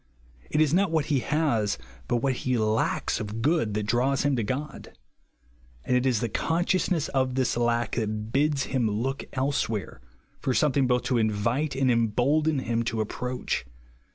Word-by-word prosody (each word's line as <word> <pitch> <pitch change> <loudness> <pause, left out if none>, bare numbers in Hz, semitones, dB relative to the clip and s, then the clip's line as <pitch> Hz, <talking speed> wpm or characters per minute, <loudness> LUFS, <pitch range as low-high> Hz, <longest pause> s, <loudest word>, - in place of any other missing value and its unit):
It 150 - +2
is 155 -1 +3
not 195 +1 +3
what 160 -3 +1
he 135 - +3
has, 120 - 0 0.3
bat 120 -1 0
what 135 -1 +2
he 130 -1 0
lacks 110 0 0
of 110 +1 -4
good 145 -8 +1
that 105 - 0
draws 125 +5 +1
him 145 -1 +2
to 120 - 0
God; 135 +7 -5 0.9
and 125 - +1
it 125 +1 +2
is 120 -5 +1
the 120 - 0
con 165 +9 0
sciousness 180 -4 +1
of 130 -2 0
this 130 -2 +1
lack 120 -1 +1
that 110 -1 -2
bids 145 0 +2
him 125 -5 0
look 125 +6 -2
elsewhere, 130 - -2 0.4
for 130 - -1
something 140 -3 +3
both 125 0 +2
to 125 -3 +1
invite 115 +7 0
and 130 -1 +2
embolden 130 +7 +2
him 115 -3 -1
to 115 -1 -2
approach. 125 +4 -2
125 Hz, 175 wpm, -26 LUFS, 115-140 Hz, 0.9 s, is